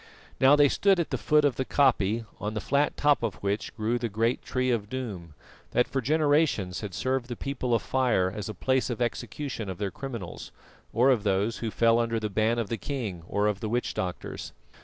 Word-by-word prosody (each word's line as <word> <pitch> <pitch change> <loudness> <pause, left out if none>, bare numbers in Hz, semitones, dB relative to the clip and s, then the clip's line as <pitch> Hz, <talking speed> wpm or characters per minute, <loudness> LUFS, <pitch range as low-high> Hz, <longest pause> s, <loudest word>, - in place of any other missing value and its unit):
Now 135 +2 +7
they 145 -1 +6
stood 195 +6 +3
at 170 - -1
the - - +1
foot 150 -1 +3
of 140 - +1
the 130 - 0
koppie, 115 -5 +2
on 105 +1 -3
the - - -1
flat 140 +6 +1
top 145 -1 +3
of 115 -5 -2
which 100 +1 -2
grew 115 +2 0
the 120 -1 -2
great 115 +4 0
Tree 130 -1 -1
of 105 -4 -1
Doom, 100 - -6 0.4
that 125 - +3
for 135 - -1
generations 145 - +2
had 100 -4 -6
served 130 +1 -1
the 120 - -5
People 130 -3 -1
of - - -1
Fire 120 -9 +1
as 105 +2 -5
a 110 - -6
place 130 +7 +1
of 120 - -3
execution 120 -1 -3
of 95 - -5
their 100 -2 -2
criminals, 120 -10 -7 0.4
or 125 +4 +4
of 120 -5 +2
those 100 +2 0
who 115 - -3
fell 115 +1 +3
under 115 -1 0
the 105 -1 -3
ban 110 +3 +1
of 115 -4 -2
the 115 - -2
king 115 - -4
or 100 0 0
of 105 -2 0
the 110 - -3
witch 120 +2 -1
doctors. 90 -1 -5
115 Hz, 220 wpm, -27 LUFS, 105-130 Hz, 0.4 s, Now